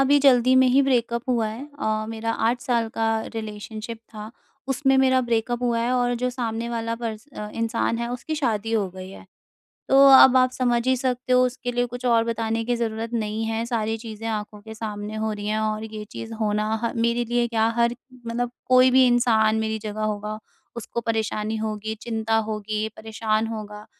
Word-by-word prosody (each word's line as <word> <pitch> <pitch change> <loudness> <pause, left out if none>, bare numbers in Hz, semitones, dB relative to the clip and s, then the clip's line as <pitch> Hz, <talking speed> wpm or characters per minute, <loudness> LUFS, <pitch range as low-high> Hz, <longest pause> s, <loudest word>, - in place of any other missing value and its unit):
अभी 280 +2 +5
जल्दी 255 -2 +5
में 260 - +6
ही 270 +3 +4
ब्रेकअप 240 -3 +1
हुआ 235 -3 +2
है। 235 +7 -7
अ, 215 0 -1
मेरा 225 0 -3 0.2
8 245 +1 -1
साल 235 -4 0
का 225 0 0 0.3
रिलेशनशिप 220 +1 -6 0.2
था। 215 +1 -7 0.4
उसमें 270 0 +2
मेरा 260 -1 +4
ब्रेकअप 240 0 -1
हुआ 235 -1 +1
है 240 +2 0
और 245 -1 +1
जो 250 - +2
सामने 235 -2 -3
वाला 230 -1 -2
पर्स 230 0 -6
अ, 210 0 -5
इंसान 230 0 -1
है 235 - -2
उसकी 250 +6 -4
शादी 225 -7 -1
हो 210 -4 +1
गई 185 +1 -9
है। - - -12 0.6
तो - - +4 0.2
अब 265 -1 +9
आप 255 0 +4
समझ 240 -2 0
ही 260 - +4
सकते 255 0 -1
हो 250 0 +5
उसके 245 -1 -3
लिए 245 0 +1
कुछ 245 +1 -7
और 230 -2 +4
बताने 225 0 -1
की 245 +1 0
ज़रूरत 230 0 -3
नहीं 220 -1 -2
है 225 +1 -2
सारी 225 -2 -1
चीज़ें 225 -1 -7
आँखों 210 -1 -4
के 220 +1 -10
सामने 210 -1 -5
हो 220 0 -1
रही 205 0 -6
हैं। 215 +1 0
और 215 0 -1
ये 215 -1 -7
चीज़ 225 0 -7
होना 210 0 0 0.2
ह 230 - 0
मेरे 235 +1 +1
लिए 240 +1 +1
क्या 225 -1 +1
हर 235 0 +2 0.3
मतलब 240 +1 -2
कोई 255 0 +5
भी 260 0 +6
इंसान 225 -3 +3
मेरी 220 0 -2
जगह 215 0 -5
होगा 210 0 -3 0.4
उसको 235 0 -4
परेशानी 220 -1 -1
होगी, 220 0 -3
चिंता 225 -1 -1
होगी, 215 0 -2
परेशान 220 0 -1
होगा। 210 -1 -7
230 Hz, 200 wpm, -24 LUFS, 215-245 Hz, 0.6 s, अब